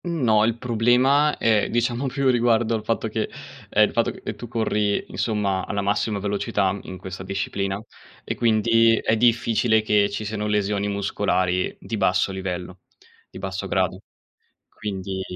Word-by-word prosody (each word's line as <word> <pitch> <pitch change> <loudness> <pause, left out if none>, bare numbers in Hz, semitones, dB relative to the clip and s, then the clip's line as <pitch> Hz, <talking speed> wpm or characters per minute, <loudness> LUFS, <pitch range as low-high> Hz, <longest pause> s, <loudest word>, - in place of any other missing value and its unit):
No, 120 -11 +2
il 115 0 0
problema 125 +5 +3
è 110 -3 +2
diciamo 120 +3 0
più 135 +1 -1
riguardo 120 -2 +2
al 110 -2 -2
fatto 115 +1 -1
che 110 0 -2 0.4
ehm, - - +4
il - - -8
fatto - - +1
che, - - -9
ehm, - - -4
tu 120 - -8
corri 105 -3 0
insomma 100 -4 -1
alla 100 -1 -2
massima 100 +1 0
velocità 100 -1 0
in 95 - -7
questa 95 0 -8
disciplina 100 +1 -3 0.4
e - - -3
quindi 115 0 +3
è 110 - +1
difficile 115 -1 +2
che 105 -1 +3
ci 105 +1 -4
siano 105 0 -3
lesioni 105 -1 0
muscolari 95 -2 0
di 115 - -5
basso 95 -1 +2
livello, 95 -1 -5 0.5
di - - -11
basso 95 0 -4
grado 95 -1 0 0.7
quindi 95 -2 -5
105 Hz, 155 wpm, -23 LUFS, 100-115 Hz, 0.7 s, ehm